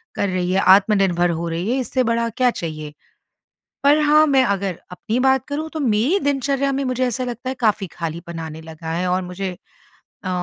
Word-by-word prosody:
कर 200 - 0
रही 180 -1 -1
है, 190 - +2
आत्मनिर्भर 190 -2 +4
हो 170 0 -2
रही 170 +6 -2
है 260 - +1
इससे 255 0 0
बड़ा 230 0 0
क्या 250 +3 +2
चाहिए। 155 -6 -6 0.9
पर 285 +2 +5
हाँ, 305 +1 +5
मैं 270 -2 +4
अगर 195 -5 -1
अपनी 215 +6 -3
बात 265 0 +2
करूँ 305 +2 -4
तो, 315 - -4
मेरी 255 - +2
दिनचर्या 275 -2 0
में 275 +1 -1
मुझे 255 0 0
ऐसा 245 +1 -2
लगता 245 +1 -5
है 260 - -3
काफ़ी 215 -4 +1
ख़ालीपन 170 0 -6
आने 160 -1 -7
लगा 160 0 -8
है 180 +2 -1
और 180 +1 +1
मुझे 185 +1 -4 0.7
अ, 185 - -3
210 Hz, 195 wpm, -21 LUFS, 180-265 Hz, 0.9 s, पर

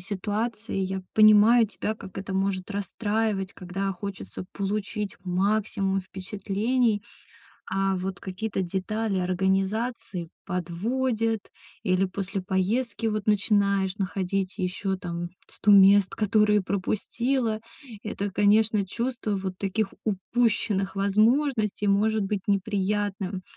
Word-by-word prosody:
ситуацией. 210 0 -2
Я 190 0 -3
понимаю 215 +2 +7
тебя, 215 +1 -3
как 190 -3 -11
это 195 0 -5
может 190 0 -1
расстраивать, 205 0 -1
когда 195 +2 -3
хочется 195 0 -7
получить 205 +1 -3
максимум 195 +1 0
впечатлений, 205 +4 -1 0.7
а 195 0 +1
вот 185 0 -4
какие-то 195 +1 -3
детали 195 +3 -1
организации 190 +1 -1 0.2
подводят 220 +6 -1 0.5
или 185 -1 +3
после 195 +1 -4
поездки, 205 +5 0
вот, 215 -1 -1
начинаешь 200 -2 +2
находить 195 -1 -2
еще, 190 +1 -1
там, 175 -1 -4 0.2
100 210 - 0
мест, 195 -1 +7
которые 210 -1 +3
пропустила. 220 +5 -1 0.4
Это, 205 -2 -3
конечно, 210 +1 +3
чувство 235 +1 -2
вот 190 -1 -4
таких 200 +1 -1
упущенных 210 -1 0
возможностей 215 +2 +2
может 210 +2 +3
быть 200 0 -1
неприятным 200 -1 -1
200 Hz, 105 wpm, -26 LUFS, 190-215 Hz, 0.7 s, понимаю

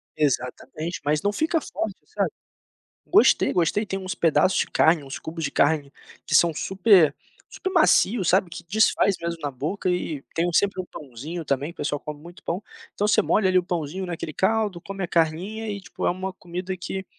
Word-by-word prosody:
Exatamente, 155 +3 -2
mas 150 +1 +1
não 205 - +1
fica 320 +6 +1
forte, 220 -8 -4
sabe - - -1 0.8
gostei, 400 +4 +4
gostei, 180 +5 +1
tem 195 -2 -3
uns 185 -1 -4
pedaços 170 +3 +3
de - - +2
carne, 160 -1 +4
uns 135 0 -7
cubos 165 0 -6
de 135 - -1
carne 145 -1 +1 0.3
que - - -3
são 170 -1 +5
super 185 -5 +4 0.4
super 380 - -4
macios, 235 - +3
sabe, 190 -1 +3
que 170 +1 -8
desfaz 200 +1 +3
mesmo 170 0 -3
na 145 - -1
boca 160 +9 -2
e 160 -5 -2
tem 165 +1 +1
o - - -2
sempre 200 0 +2
um 180 - -6
pãozinho 150 +6 -7
também, 140 +2 -1
o 170 - -14
pessoal 145 0 -2
come 150 -1 -7
muito 175 +3 -13
pão. 180 +5 -3 0.3
Então 205 - 0
você 210 - +4
molha 210 - +2
ali 185 0 +4
o 180 - +2
pãozinho 175 +1 -3
naquele 165 -2 -5
caldo, 205 0 0
come 195 0 -5
a - - -1
carninha 180 +8 0
e, 205 - -3
tipo, 195 - -5
é - - +4
uma 185 +1 -4
comida 180 +1 -5
que 190 +2 -5
175 Hz, 200 wpm, -24 LUFS, 155-195 Hz, 0.8 s, são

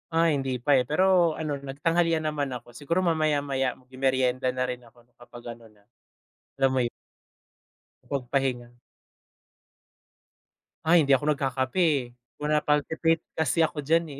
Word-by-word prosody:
Ah, 165 +1 +4
hindi 135 -5 -1
pa, 140 +4 +3
eh, 130 - +3
pero 170 +3 +2
ano, 155 -2 -2
nagtanghalian 160 +4 0
naman 145 -3 -2
ako. 120 -1 -8
Siguro 150 +7 -1
mamaya-maya, 145 -6 0
magmemeryenda 130 0 0
na 130 0 -2
rin 125 0 -5
ako 120 0 -21
kapag 120 -1 -10
ano 115 -1 -18
na, 105 -1 -28 0.7
alam 135 0 +4
mo - - +2
'yo 120 - -1 1.2
Makapag 140 -2 -2
pahinga. 130 -3 0 2.2
Ay, 165 -1 +5
hindi 140 - +4
ako 145 +3 +2
nagkakape, 135 +1 -2
eh, 155 -7 +3 0.4
wala, 150 +1 +1
palpitate 155 +2 +1 0.2
kasi 160 +1 +1
ako 155 -2 -1
diyan 165 +3 +3
eh. - - -8
140 Hz, 145 wpm, -26 LUFS, 130-160 Hz, 2.2 s, Ay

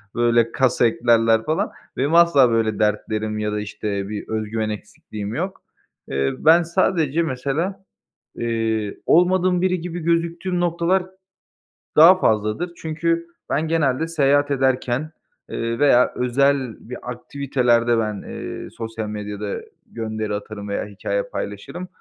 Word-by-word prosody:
böyle, 120 -1 +3
kas 130 -2 +1
eklerler 115 -1 +3
falan. 155 - 0 0.3
Benim 145 +5 +1
asla 170 -7 +6
böyle 110 -2 +1
dertlerim 105 0 -1
ya 105 0 -1
da, 105 - -2
işte, 100 -1 -4
bir 105 -1 -5
özgüven 110 0 -2
eksikliğim 105 0 -7
yok. 185 +4 -4 0.5
Eee, 70 0 0
ben 165 +3 +6
sadece 170 -2 +1
mesela, 160 +8 -2 0.5
eee, 115 -3 -1
olmadığım 180 +1 +3
biri 185 -1 +1
gibi 175 +1 -5
gözüktüğüm 170 +2 0
noktalar 175 +2 +1 0.9
daha 175 +4 +8
fazladır. 110 - 0
Çünkü 165 +1 -1 0.2
ben 155 +3 0
genelde 160 -1 +1
seyahat 145 -2 +2
ederken, 130 +2 0 0.4
eee, 115 0 -3
veya 130 -4 +4
özel 130 -1 +1
bir 125 - -5
aktivitelerde 125 -2 +1
ben, 105 -2 -2
eee, - - -7
sosyal 110 -1 -6
medyada 105 -1 -4 0.3
gönderi 110 -2 -4
atarım 105 0 -7
veya 100 - -2
hikâye 100 0 -3
paylaşırım, 105 - -6
125 Hz, 125 wpm, -22 LUFS, 110-165 Hz, 0.9 s, daha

